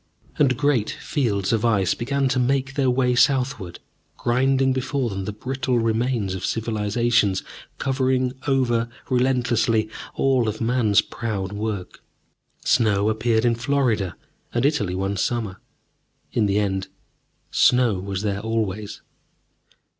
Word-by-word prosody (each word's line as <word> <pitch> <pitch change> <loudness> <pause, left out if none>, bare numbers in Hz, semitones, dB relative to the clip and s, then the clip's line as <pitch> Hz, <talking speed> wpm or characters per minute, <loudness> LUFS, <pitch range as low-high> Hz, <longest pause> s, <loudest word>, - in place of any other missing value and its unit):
And 130 -4 +3
great 140 -6 +1
fields 105 -8 -1
of 110 -1 +1
ice 100 -6 +2
began 135 +3 -1
to 125 - +1
make 135 +2 0
their 135 -2 +1
way 125 0 +2
southward, 125 -8 +1 0.4
grinding 130 +2 +2
before 130 -2 -1
them 95 -1 -4
the 105 - -3
brittle 130 +3 -2
remains 115 -3 0
of 95 -1 -5
civilizations, 110 -2 +1 0.3
covering 130 -1 0
over 120 -4 +1 0.2
relentlessly 120 -3 +2 0.3
all 130 -4 +2
of 110 - -5
man's 115 -3 +3
proud 100 -5 -4
work. 105 -3 -4 0.7
Snow 105 -2 +3
appeared 110 +1 +1
in 120 - +4
Florida 115 -7 0 0.4
and 120 +2 0
Italy 120 - +1
one 95 +1 -2
summer. 105 -2 -2 0.7
In 110 -3 +1
the 100 +1 +1
end, 95 -2 -1 0.6
snow 125 -6 +3
was 95 +1 -4
there 100 -1 -1
always. 105 -2 -3
115 Hz, 125 wpm, -23 LUFS, 105-130 Hz, 0.7 s, in